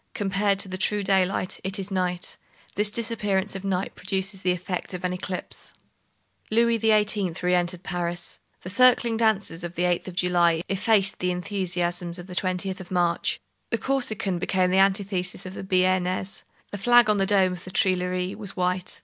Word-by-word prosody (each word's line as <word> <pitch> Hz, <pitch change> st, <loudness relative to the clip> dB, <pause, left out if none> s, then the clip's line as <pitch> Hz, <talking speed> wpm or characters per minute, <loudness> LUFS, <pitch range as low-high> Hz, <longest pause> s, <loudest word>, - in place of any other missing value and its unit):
Compared 200 Hz, 0 st, +1 dB
to 195 Hz, -, -2 dB
the 185 Hz, 0 st, -6 dB
true 205 Hz, +2 st, +1 dB
daylight, 190 Hz, -1 st, 0 dB
it 190 Hz, +2 st, -2 dB
is 195 Hz, 0 st, -4 dB
night. 180 Hz, -1 st, -2 dB, 0.4 s
This 210 Hz, +1 st, +4 dB
disappearance 210 Hz, -3 st, -1 dB
of 195 Hz, -, -6 dB
night 190 Hz, -1 st, -2 dB
produces 190 Hz, 0 st, -2 dB
the 180 Hz, -, +1 dB
effect 180 Hz, +1 st, -4 dB
of 180 Hz, -, -7 dB
an 180 Hz, 0 st, -1 dB
eclipse. 180 Hz, 0 st, -6 dB, 0.7 s
Louis 230 Hz, +1 st, +3 dB
XVIII. 210 Hz, -4 st, +2 dB
re 180 Hz, 0 st, +2 dB
entered 175 Hz, 0 st, 0 dB
Paris. 175 Hz, -1 st, -4 dB, 0.2 s
The 185 Hz, -, -4 dB
circling 240 Hz, +1 st, +4 dB
dances 205 Hz, -7 st, 0 dB
of 175 Hz, 0 st, -6 dB
the 175 Hz, -, -1 dB
8th 175 Hz, 0 st, 0 dB
of 185 Hz, -, -7 dB
July 175 Hz, -2 st, +2 dB
effaced 195 Hz, 0 st, +3 dB
the 180 Hz, -, 0 dB
enthusiasms 180 Hz, -2 st, -2 dB
of 175 Hz, -, -9 dB
the 185 Hz, -, -10 dB
20th 185 Hz, +1 st, -1 dB
of 185 Hz, -, -10 dB
March. 175 Hz, -2 st, 0 dB, 0.3 s
The 230 Hz, -, 0 dB
Corsican 220 Hz, -8 st, -1 dB
became 185 Hz, 0 st, +1 dB
the 190 Hz, -, +3 dB
antithesis 195 Hz, -1 st, +1 dB
of 185 Hz, -, -7 dB
the -, -, -7 dB
Bearnese. 185 Hz, 0 st, 0 dB, 0.3 s
The 205 Hz, -, -5 dB
flag 240 Hz, +1 st, +5 dB
on 210 Hz, -1 st, +3 dB
the 195 Hz, -1 st, +1 dB
dome 190 Hz, -2 st, +4 dB
of 175 Hz, -, -8 dB
the -, -, -9 dB
Tuileries 185 Hz, 0 st, 0 dB
was 205 Hz, -3 st, -3 dB
white. 180 Hz, 0 st, -2 dB
185 Hz, 180 wpm, -25 LUFS, 180-200 Hz, 0.7 s, flag